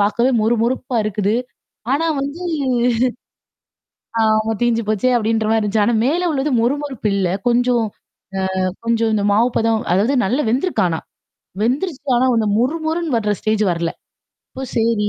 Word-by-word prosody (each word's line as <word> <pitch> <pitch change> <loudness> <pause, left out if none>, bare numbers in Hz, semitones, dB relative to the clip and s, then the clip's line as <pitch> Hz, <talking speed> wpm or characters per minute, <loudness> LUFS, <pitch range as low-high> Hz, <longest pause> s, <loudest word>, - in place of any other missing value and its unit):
பார்க்கவே 235 +5 +2
மொறு 230 +2 +3
மொறுப்பா 250 0 -2
இருக்குது. 210 0 0 0.6
ஆனா 325 +4 +1 0.2
வந்து 285 +5 -5 1.8
ஆமா, 215 0 +2
தீஞ்சு 235 -1 +2
போச்சு 215 +3 +1
அப்படின்ற 225 -1 +1
மாதிரி 225 0 +3
இருந்துச்சு. 210 0 +1
ஆனா 240 - +2
மேல 345 +6 +1
உள்ளது 285 0 0
மொறு 245 +4 +2
மொறுப்பு 265 -7 -4
இல்ல. 190 -2 +1 0.2
கொஞ்சம் 245 0 +2 0.8
அ 185 - +1 0.2
கொஞ்சம் 230 -1 +1
இந்த 205 -2 +1
மாவு 230 +4 +3
பதம் 225 -1 +2
அதாவது 210 +9 +2
நல்லா 255 +9 0
வெந்துருக்கு. 270 - +1
ஆனா 160 -1 -2 0.6
வெந்துருச்சு. 275 +5 -1
ஆனா 255 +2 +3
அந்த 220 -1 +1
மொறு 260 +8 +1
மொறுன்னு 320 -3 -1
வர்ற 210 -2 0
ஸ்டேஜ் 215 0 0
வரலை. 170 -1 -1 0.6
அப்போ 265 - -5
சரி. 225 -2 +1
230 Hz, 150 wpm, -19 LUFS, 215-260 Hz, 1.8 s, மொறு